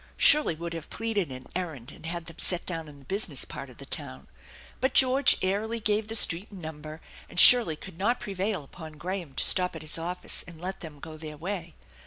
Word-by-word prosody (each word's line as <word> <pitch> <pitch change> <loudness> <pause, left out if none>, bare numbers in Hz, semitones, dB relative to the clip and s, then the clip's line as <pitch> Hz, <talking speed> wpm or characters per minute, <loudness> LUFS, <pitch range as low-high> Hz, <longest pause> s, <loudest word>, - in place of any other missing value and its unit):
Shirley 300 - +6
would 170 +1 -6
have 165 -2 -7
pleaded 210 -9 -2
an 130 0 -9
errand 160 -10 -5
and 165 - -10
had 170 0 -4
them 165 0 -13
set 180 -1 +1
down 165 -3 -4
in 145 -1 -13
the 140 - -18
business 200 +8 -2
part - - -8
of - - -15
the - - -11
town; - - -4 0.5
but 260 +2 0
George 265 +1 +6
airily 215 +5 -1
gave 215 0 0
the 225 - -2
street 185 -2 +3
and 195 - -11
number, 155 -1 -8 0.3
and - - -2
Shirley 235 -11 +9
could 175 +2 -12
not 235 +6 +1
prevail 195 -3 -3
upon 155 +3 -11
Graham 170 -2 -6
to - - +1
stop 180 -2 +3
at 160 - -8
his 155 +1 +1
office 175 +2 -2
and 170 -3 -12
let 185 +3 -5
them 155 -4 -10
go 155 -1 -9
their 155 -1 -8
way. 170 0 -5
175 Hz, 220 wpm, -27 LUFS, 155-205 Hz, 0.5 s, Shirley